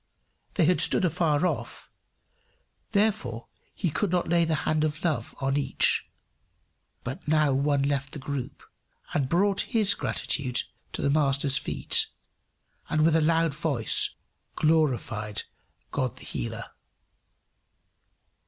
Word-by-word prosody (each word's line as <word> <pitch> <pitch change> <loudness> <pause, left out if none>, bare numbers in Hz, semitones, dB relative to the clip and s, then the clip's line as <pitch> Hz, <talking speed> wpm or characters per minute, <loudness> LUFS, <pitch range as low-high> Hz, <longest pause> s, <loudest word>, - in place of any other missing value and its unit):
They 175 - +3
had 180 +3 +3
stood - - +5
afar 165 -1 +1
off, - - -4 1.0
therefore 200 - 0 0.3
he 175 -6 -1
could 205 +5 0
not 180 0 0
lay 170 0 +3
the 160 -1 0
hand 155 0 +1
of 155 0 -2
love 160 -4 -1
on 135 +1 0
each. 145 - +1 0.9
But 130 +4 -6
now 155 -2 +3
one 140 +1 +1
left 140 -1 -1
the - - -5
group 140 -2 -5 0.5
and 135 -3 0
brought 195 +3 +2 0.2
his 205 -2 +5
gratitude 130 -4 -1 0.3
to - - -3
the 140 - +2
Master's 140 -2 +2
feet, - - +1 0.8
and 155 0 +2
with 165 -1 +4
a 165 - +4
loud 165 0 +2
voice 140 -7 +2 0.5
glorified 125 -9 0 0.5
God 130 -4 -2
the - - -10
Healer. - - -5
150 Hz, 125 wpm, -27 LUFS, 135-165 Hz, 1.0 s, stood